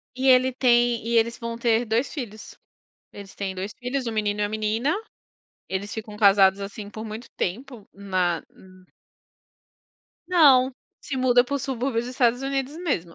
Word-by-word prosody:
E 260 +1 -1
ele 255 0 +5
tem 240 -2 +2
e 235 0 +1
eles 235 +1 +1
vão 230 -1 -5
ter 235 0 +1
2 225 +5 -1
filhos. 220 -7 -7 0.6
Eles 200 -1 -11
têm 195 -2 -4
2 190 +3 -5
filhos, 250 0 -3
1 230 - -2
menino 210 -1 -1
e - - +2
1 205 - -1
menina. 220 +7 0 0.7
Eles 195 +2 -4
ficam 215 -1 -7
casados, 200 -1 +5
assim, 205 +1 -7
por 220 +1 -7
muito 220 +3 -8
tempo 235 +3 -4
na 185 -4 -1
hum. 185 0 -19 1.4
Não, 270 -7 +5 0.2
se 275 - -6
muda 250 -1 +4
para 260 +3 -3
o 280 - -2
subúrbio 255 -2 -2
dos 245 - -6
Estados 245 -1 +1
Unidos 270 +1 -2
mesmo. 220 - -2
230 Hz, 170 wpm, -24 LUFS, 205-255 Hz, 1.4 s, ele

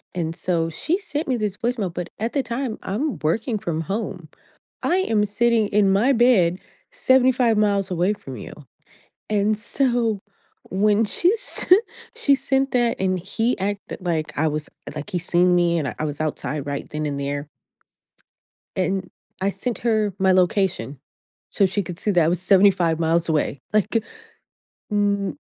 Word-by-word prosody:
And 165 -2 -2
so 165 -2 -1
she 320 - -1
sent 300 -6 -4
me 255 -2 +1
this 205 -2 -2
voicemail, 225 -7 -2
but 175 0 -5
at 225 +2 -2
the 275 - +1
time 235 0 -3
I'm 260 +9 -2
working 215 +9 0
from 165 -6 -2
home. 195 -3 -4 0.5
I 360 - +2
am 220 - +2
sitting 225 +1 +2
in 200 -2 +3
my 215 +8 +3
bed, 200 -8 +4 0.3
75 260 - +3
miles 200 -2 +1
away 180 +4 +1
from 135 - -9
you. - - -8 0.8
And 210 0 +2
so 230 -1 0 0.5
when 210 +3 +2
she 355 - +2
sent 405 +1 +2 0.3
she 280 -1 +3
sent 270 0 0
that 240 -2 +1
and 185 -1 0
he 225 +7 -1
acted 200 +1 -3
like 165 -4 -2
I 155 +2 +2
was 150 0 -3 0.3
like 150 - -6
he 180 - 0
seen 180 +1 +3
me 170 -1 +3
and 140 -5 -2
I - - -1
was 145 0 -4
outside 150 -2 -3
right 140 0 -4
then 150 0 -3
and 140 -1 -2
there 145 +1 -3 1.3
And 185 0 -1 0.3
I 190 - +1
sent 235 +4 -3
her 215 -4 +1
my 190 -1 +4
location 185 - +1 0.5
so 195 - +3
she 200 +2 -1
could 170 -1 -7
see 210 - -1
that 175 -3 +4
I 160 - +2
was 175 +1 0
75 185 -4 +4
miles 165 +1 +1
away. 150 -3 0
Like, 215 +1 +2 0.9
mm 200 +3 0
200 Hz, 165 wpm, -22 LUFS, 170-230 Hz, 1.3 s, bed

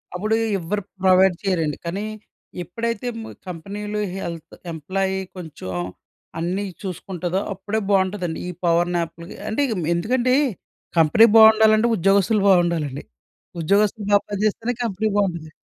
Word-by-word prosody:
అప్పుడు 215 +4 0 0.2
ఎవ్వరు 195 +5 -2 0.2
ప్రొవైడ్ 185 0 +5
చెయ్యరండి. 165 -6 0
కానీ 190 +5 -3 0.6
ఎప్పుడైతే 230 +6 -3
మ్ - - -7 0.2
కంపెనీలు 205 +5 -5 0.2
హెల్త్ 170 -4 -6 0.2
ఎంప్లాయి 190 +5 -2 0.2
కొంచెం 155 - -7 0.7
అన్నీ 180 +4 -1 0.2
చూసుకుంటదో 185 -1 -3
అప్పుడే 205 +3 -3
బావుంటదండి. 190 -3 0
ఈ - - -3 0.2
పవర్ 170 +1 +2
నాప్‌లు 170 0 -3 0.2
అంటే 220 +6 0 0.3
ఎందుకంటే 245 +8 +1 0.6
కంపెనీ 165 +8 +6
బావుండాలంటే 220 0 +7
ఉద్యోగస్తులు 200 +2 +3
బావుండాలండి. 170 -7 +2 0.6
ఉద్యోగస్తులు 205 +5 +2
బా 205 - +7
పని 205 -1 -3
చేస్తేనే 225 +3 0
కంపెనీ 220 -1 -1
బావుంటది. 170 -6 -1
190 Hz, 115 wpm, -22 LUFS, 170-210 Hz, 0.7 s, బావుండాలంటే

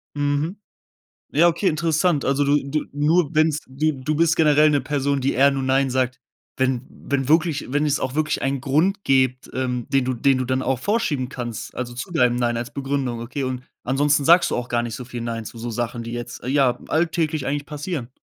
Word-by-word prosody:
Mhm. 145 +5 -1 0.7
Ja, 165 +4 +5
okay, 175 +3 +1
interessant. 155 0 +1
Also, 140 +1 +2
du 145 +1 +3
du 150 +2 -2
nur 150 +3 +2
wenn 155 0 +4
es 155 -1 -2
du 155 +4 0
du 135 +3 -2
bist 165 +1 +3
generell 150 -1 +5
'ne 145 -3 +2
Person, 140 0 -1
die 135 +1 0
eher 140 +2 +5
nur 135 -1 -2
„nein“ 135 0 +2
sagt, 130 0 -1 0.4
wenn 130 -2 +1
wenn 135 -2 -3
wirklich 155 -4 +1
wenn 150 +1 +2
es 145 0 +1
auch 130 0 -3
wirklich 155 0 0
einen 135 -1 -1
Grund 170 +10 +1
gebt, 130 -1 +1
ähm, 125 -2 -2
den 135 -2 +2
du 130 - 0
den 135 +2 +2
du 130 - -1
dann 130 +1 0
auch 130 0 0
vorschieben 145 - 0
kannst, 120 -4 -6
also 120 -1 -4
zu 125 +9 -6
deinem 125 -7 +3
„nein“ 120 -1 0
als 120 +3 -5
Begründung, 135 -4 -2
okay, 135 +4 -4
und 130 -1 -3 0.2
ansonsten 140 +2 +2
sagst 170 +3 +5
du - - +1
auch 125 0 -4
gar 120 0 +1
nicht 120 -1 -5
so 125 - -7
viel 120 -1 -6
„nein“ 115 -1 -4
zu 115 - -9
so 115 +1 -5
Sachen, 120 +1 -3
die 115 - -7
jetzt, 120 0 -6
ja, 130 -2 +2
alltäglich 160 -3 0
eigentlich 145 +1 -2
passieren. 150 -4 -5
135 Hz, 215 wpm, -22 LUFS, 125-150 Hz, 0.7 s, Ja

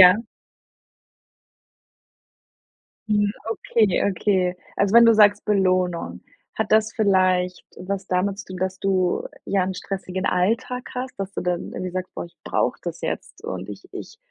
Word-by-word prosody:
ja? 225 - -6 2.8
Mhm, 205 -1 +2 0.2
okay, 220 -3 +1
okay. 185 -2 +1 0.2
Also 200 +1 +2
wenn 235 0 +9
du 230 - +7
sagst 210 -1 +5
Belohnung, 185 - +1 0.3
hat 220 -1 -2
das 220 0 +4
vielleicht 185 -3 +2
was 195 +1 -4
damit 190 +2 0
zu - - -7
tun, 185 - -7
dass 185 +1 -2
du, 185 -2 +1 0.2
ja, 195 -2 +1
‘n 190 +1 -2
stressigen 185 0 -4
Alltag 225 +7 0
hast, 255 +1 -4
dass 195 0 -4
du - - -3
dann 180 0 -2
irgendwie 185 0 -4
sagst: 185 0 -4
„Boah, - - -5
ich 170 - -19
brauche - - 0
das - - -5
jetzt - - -5
und - - -5
ich - - -9
ich 455 - -8
190 Hz, 150 wpm, -23 LUFS, 185-210 Hz, 2.8 s, wenn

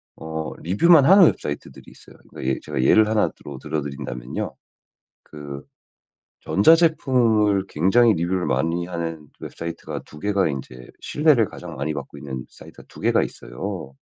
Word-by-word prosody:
어 80 -1 -5
리뷰만 140 - +5
하는 190 +2 +8
웹사이트들이 75 - -3
있어요. - - -18
그러니까 65 - -3
예 65 - -2
제가 - - -3
예를 110 +11 +5
하나 110 -1 +2
들어 70 -2 -11
들어드린다면요 70 -5 -5 0.7
그 70 -1 -9 0.8
전자제품을 115 - +3
굉장히 110 +9 +4
리뷰를 90 +1 -1
많이 85 +2 -1
하는 80 -3 -5
웹사이트가 85 0 -7
2 75 - -13
개가 100 0 +1
인제 65 -3 -7
신뢰를 145 -7 +3
가장 - - -10
많이 75 +3 -3
받고 70 0 -8
있는 65 -2 -7
사이트가 - - -15
2 - - -14
개가 - - +2
있어요. 65 +2 -6
85 Hz, 340 characters per minute, -22 LUFS, 70-110 Hz, 0.8 s, 하는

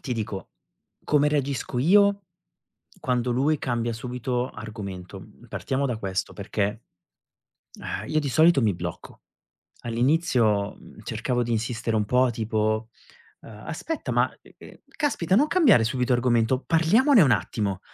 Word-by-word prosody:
ti 130 - -4
dico, 105 -5 -5 0.5
come 150 0 +3
reagisco 140 -4 -2
io 200 +7 +4 0.8
quando 125 -1 0
lui 140 +5 +1
cambia 120 -2 -2
subito 125 +1 -3
argomento, 100 -4 -8
mhmm, - - -17
partiamo 135 +1 -2
da 125 -4 -2
questo, 95 -2 -3
perché, 105 +2 -3 1.0
ehm, - - -5
io 155 - +1
di 145 - -3
solito 155 +1 +4
mi 105 -4 +2
blocco. - - -7 0.6
All'inizio, 120 - +1
mhmm, - - -15
cercavo 120 +3 -2
di 120 - -4
insistere 115 0 -1
un 105 - +1
po' 125 +4 +2
tipo, 110 -1 -1 0.5
uhm: 110 -1 -13
"Aspetta 315 - -4
ma, - - +2
uhm, - - -19
uhm, - - -13 0.2
caspita 275 - 0
non 285 +7 +4
cambiare 285 - +5
subito 125 +2 0
argomento, 120 0 +2
parliamone 205 - +4
un 135 - +4
attimo." 100 -6 -1
125 Hz, 140 wpm, -25 LUFS, 110-150 Hz, 1.0 s, cambiare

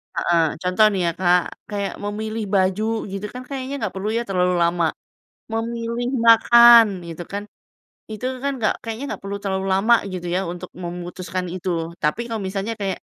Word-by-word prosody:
Heeh, 170 -1 +2 0.2
contoh 185 +4 +4
nih 195 -2 -1
ya 170 - +2
Kak, 180 -1 +4 0.3
kayak 200 -1 -3
memilih 215 +2 -3
baju 190 +1 +2 0.3
gitu 195 +1 -4
kan 250 - -6
kayaknya 270 0 -4
nggak 215 -6 -3
perlu 195 +2 -2
ya - - +1
terlalu 180 -1 +2
lama? 170 0 +1 0.7
Memilih 230 +1 -2 0.2
makan 235 0 +8 0.2
gitu 170 +1 -6
kan, 200 +1 -3 0.7
itu 215 +3 -7 0.2
kan 280 - +1
nggak 215 -3 +2
kayaknya 230 +3 -5
nggak - - -6
perlu 200 +1 -4
terlalu 190 -1 -2
lama 215 +5 +4 0.2
gitu 175 -1 -5
ya 185 - +1
untuk 180 +1 -8
memutuskan 180 +1 -5
itu 185 0 -5
loh. 165 0 -3
Tapi 150 +8 +1
kalau 225 -3 -3
misalnya 195 +3 -3
kayak, 195 -2 -2
200 Hz, 175 wpm, -22 LUFS, 180-225 Hz, 0.7 s, makan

